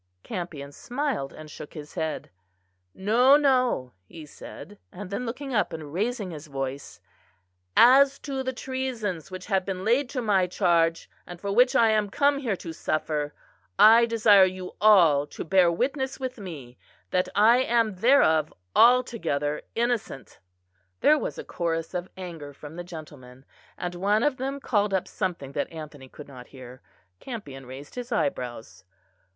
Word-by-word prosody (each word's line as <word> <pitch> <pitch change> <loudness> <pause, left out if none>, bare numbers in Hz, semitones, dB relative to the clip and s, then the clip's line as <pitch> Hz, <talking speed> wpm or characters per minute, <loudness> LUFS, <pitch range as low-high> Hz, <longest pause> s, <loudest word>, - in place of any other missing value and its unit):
Campion 155 -6 -6
smiled 245 - -3
and 155 -1 -11
shook 150 - -10
his 150 -1 -9
head. 160 - -4 0.6
"No, 245 +8 +5
no," 255 - +1
he 160 -2 -11
said: 205 +6 -12
and 190 +1 -9
then 230 +5 -3
looking 270 +3 -5
up 215 - 0
and 155 -2 -8
raising 210 0 -2
his 155 -1 -9
voice, 135 -3 -6 0.8
"as 270 +3 +7
to 270 -2 -4
the 260 0 -2
treasons 250 - -4
which 185 -1 -8
have 195 -3 0
been 190 0 -5
laid 245 +4 +2
to 265 - -3
my 200 -6 +2
charge, 170 -3 +1 0.2
and 175 -1 -9
for 200 +2 -4
which 245 +5 +4
I 230 -1 +5
am 210 -1 +1
come 280 +5 +2
here 235 -8 -1
to 165 -2 -8
suffer, 150 -2 -2 0.4
I 230 +2 +7
desire 215 -4 +5
you 185 0 -6
all 170 -9 +5
to - - -7
bear 180 0 +4
witness 265 - -2
with 255 -2 -5
me, 145 -11 -9 0.3
that 180 0 +1
I 220 +4 +6
am 230 -4 +1
thereof 180 - +4 0.2
altogether 205 - +3
innocent." 230 - -3 0.6
There 305 0 +5
was - - -4
a - - -6
chorus 165 -1 -3
of 180 0 -4
anger 165 -6 -8
from 150 +2 -11
the 175 - -6
gentlemen, 145 -7 -12 0.3
and 180 0 -4
one 200 +5 +1
of 295 -3 +1
them 270 +2 -4
called 205 -6 0
up 190 - -1
something 175 -8 -4
that 140 - -3
Anthony 150 -4 -10
could 150 - -12
not 125 -3 -12
hear. 130 -1 -12 0.4
Campion 140 - -8
raised 135 +3 -10
his 245 0 -7
eyebrows. 125 - -3
185 Hz, 160 wpm, -26 LUFS, 155-240 Hz, 0.8 s, as